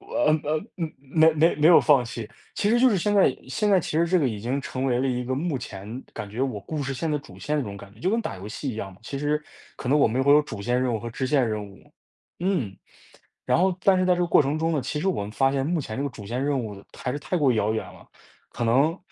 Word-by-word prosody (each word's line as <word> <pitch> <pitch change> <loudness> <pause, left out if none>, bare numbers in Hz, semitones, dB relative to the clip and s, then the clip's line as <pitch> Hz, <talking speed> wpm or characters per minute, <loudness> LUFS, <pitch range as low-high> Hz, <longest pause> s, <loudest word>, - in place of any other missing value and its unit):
就， - - -19
呃， - - 0 0.2
呃， 155 +1 0 0.2
嗯， 165 -4 -3
没 155 +4 +4
没 160 +2 +3
没 150 - +3
有 175 - +8
放 140 -5 +4
弃。 115 -1 -6 0.3
其 205 - +1
实 240 - +4
就 260 - +6
是 215 - +2
现 205 +3 0
在 190 -10 +4
现 210 +10 0
在 195 -2 +5
其 - - -6
实 170 - +3
这 180 +2 +3
个 140 -6 +2
已 110 - -4
经 125 +6 -1
成 130 -1 -4
为 125 -2 +1
了 135 - +1
一 125 -1 -1
个 130 +1 -1
目 145 0 -1
前 110 +1 -7
感 105 -2 -7
觉 110 +5 -5
我 130 -6 -1
故 145 +9 -4
事 135 0 -3
线 155 +5 -2
的 150 - +1
主 140 - -14
线 150 +1 -2
的 145 - +1
那 110 - -6
种 100 - -7
感 100 0 -12
觉， 105 - -20
就 180 - 0
跟 230 +2 +1
打 220 - -5
游 95 +2 -9
戏 130 +5 -4
一 110 - -7
样 95 -3 -5
嘛， 95 - -19
其 140 +4 -5
实 150 +1 0 0.3
可 125 - -6
能 145 +3 +4
我 140 - +5
们 125 +4 0
会 140 +1 +5
有 150 - +7
主 110 -8 -7
线 125 +3 +1
任 125 -2 0
务 110 - -2
和 120 - -6
支 130 +3 -3
线 130 -3 +2
任 105 -1 -3
务。 95 - -18 0.5
嗯。 170 - -1 0.7
然 - - +2
后 185 -1 +2
但 190 -1 +5
是 185 - +2
在 180 - +4
这 180 - -2
个 - - +1
过 - - +5
程 140 +3 -1
中 165 +1 0
呢， 150 - +1
其 135 +4 -3
实 175 - -2
我 185 - +1
们 100 - -6
发 135 +4 +2
现 135 -1 0
目 170 +2 0
前 130 -5 -5
这 - - 0
个 145 - -1
主 115 -6 -11
线 120 +6 -3
任 140 -1 +1
务 105 -5 -6
还 125 - -3
是 145 - -3
太 165 +5 -2
过 145 -6 +3
遥 110 -1 +1
远 110 - -2
了， - - -14 0.4
可 120 - -4
能 140 +10 +3
135 Hz, 330 characters per minute, -25 LUFS, 115-160 Hz, 0.7 s, 有